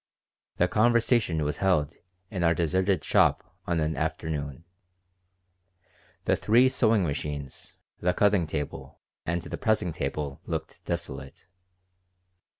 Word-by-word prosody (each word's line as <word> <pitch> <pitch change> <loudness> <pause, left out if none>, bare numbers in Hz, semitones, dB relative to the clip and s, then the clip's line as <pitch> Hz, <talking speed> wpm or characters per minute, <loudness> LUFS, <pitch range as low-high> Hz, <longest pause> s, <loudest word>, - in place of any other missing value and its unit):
The 90 - +3
conversation 110 -6 +3
was 75 0 -2
held 90 -7 +2 0.4
in 95 -4 -2
our 85 0 +4
deserted 95 +2 +1
shop - - +2
on 85 -1 +1
an 80 0 0
afternoon. 75 -1 -3 1.6
The - - +3
three 120 +4 +4
sewing 115 -5 +3
machines, 70 -3 -5 0.2
the 90 - +2
cutting 100 -5 +3
table, 75 -2 -5 0.3
and 85 +1 -1
the - - -6
pressing 110 -6 +1
table 70 -1 -4
looked - - -5
desolate. 75 -5 -5
85 Hz, 115 wpm, -27 LUFS, 75-100 Hz, 1.6 s, our